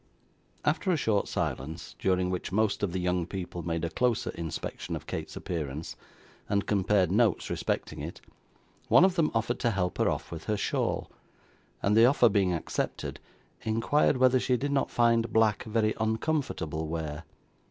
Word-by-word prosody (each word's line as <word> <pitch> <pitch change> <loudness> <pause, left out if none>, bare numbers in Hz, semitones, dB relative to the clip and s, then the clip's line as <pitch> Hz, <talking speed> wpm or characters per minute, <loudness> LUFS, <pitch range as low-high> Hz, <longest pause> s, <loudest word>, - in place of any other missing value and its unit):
After 190 - +1
a 175 - +3
short 110 -7 +1
silence, 75 +5 -4
during 90 -1 +1
which 90 - -3
most 105 +1 +1
of 100 - 0
the 95 - -2
young 90 -1 0
people 90 -2 -5
made 85 0 -2
a - - -2
closer 125 +1 +1
inspection 80 -3 -5
of - - -7
Kate's - - -5
appearance, 80 -4 -4 0.5
and 100 0 +1
compared 100 -2 +2
notes 110 -1 +2
respecting - - -2
it, - - -6 0.7
one 175 - +7
of 190 - +3
them 165 -4 +2
offered 115 +2 0
to 120 - +2
help 95 -4 -1
her - - +3
off - - -3
with 80 -2 -7
her 105 - 0
shawl, - - -1 0.7
and 100 +1 +3
the 115 +2 +7
offer 125 -3 +5
being 100 -3 +2
accepted, 85 -3 -3 0.4
inquired 115 +6 +2
whether 130 0 +5
she 125 0 +1
did 140 +3 -2
not 140 -1 +1
find 115 -1 +2
black 110 -3 +2
very 110 -1 +1
uncomfortable 110 - -1
wear. 80 -1 -4
105 Hz, 165 wpm, -29 LUFS, 90-115 Hz, 0.7 s, one